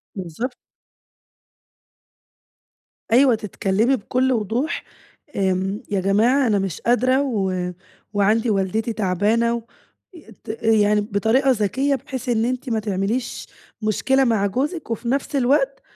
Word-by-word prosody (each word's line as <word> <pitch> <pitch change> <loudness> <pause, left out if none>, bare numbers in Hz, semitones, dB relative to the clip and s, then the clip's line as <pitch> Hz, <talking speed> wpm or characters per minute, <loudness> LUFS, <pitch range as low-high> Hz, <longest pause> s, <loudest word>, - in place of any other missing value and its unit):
بالضبط. 200 - -5 2.6
أيوه 250 +1 +5
تتكلمي 210 +4 0
بكل 255 +3 0
وضوح، 240 - -1 0.5
آمم 190 +1 0
"يا 200 - +1
جماعة 230 +8 +3
أنا 210 -3 +2
مش 190 -4 -4
قادرة 255 +3 +2
و 190 -9 -1 0.4
وعندي 215 +3 +2
والدتي 210 +3 0
تعبانة." 220 +4 +1 0.5
ي 315 -10 -14
ت - - -13
يعني 210 -2 +3
بطريقة 225 +6 +2
ذكية 260 +5 +1
بحيث 260 0 -6
إن 225 -1 +2
أنتِ 255 +2 -3
ما 225 -2 0
تعمليش 210 +4 -2 0.3
مشكلة 265 +5 +2
مع 225 -5 +2
جوزِك 280 - -3
وفي 230 +1 -3
نفس 275 +2 -1
الوقت 275 +1 +2
225 Hz, 115 wpm, -22 LUFS, 200-255 Hz, 2.6 s, أيوه